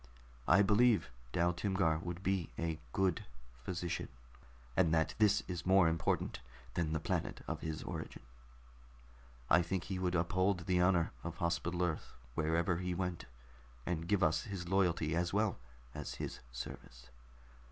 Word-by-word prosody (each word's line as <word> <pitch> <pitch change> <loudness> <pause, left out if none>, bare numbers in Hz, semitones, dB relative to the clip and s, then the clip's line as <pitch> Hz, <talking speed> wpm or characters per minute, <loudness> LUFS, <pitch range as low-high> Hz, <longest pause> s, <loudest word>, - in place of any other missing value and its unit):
I 100 - +6
believe 110 +2 +4 0.2
Dal 85 +3 +2
Timgar 90 -4 +1
would 90 +1 -5
be 95 -4 0
a 80 -1 -2
good 95 -3 +1 0.4
physician, 90 +3 -3 0.7
and 85 -4 +4
that 80 -1 +2
this 105 -2 +4
is 90 -2 -4
more 95 -1 +5
important 80 -6 0 0.3
than 80 -2 0
the 80 - +1
planet - - -2
of - - -3
his 80 -1 -4
origin. - - -6 1.2
I 85 +6 +6
think 90 +1 -2
he 95 +1 -4
would 90 -1 0
uphold 90 +2 +2
the 90 0 +2
honor 90 -2 +3
of 85 0 -5
Hospital 85 0 0
Earth 80 -3 -2 0.2
wherever 80 +4 +1
he 90 0 -2
went, 90 -1 -2 0.6
and 85 -1 -2
give 100 -2 +2
us 80 +5 +2
his 95 -5 -5
loyalty 85 -4 +2
as 85 +1 0
well 105 -4 +1 0.3
as 75 -1 -5
his - - -5
service. - - -8
90 Hz, 150 wpm, -35 LUFS, 80-95 Hz, 1.2 s, I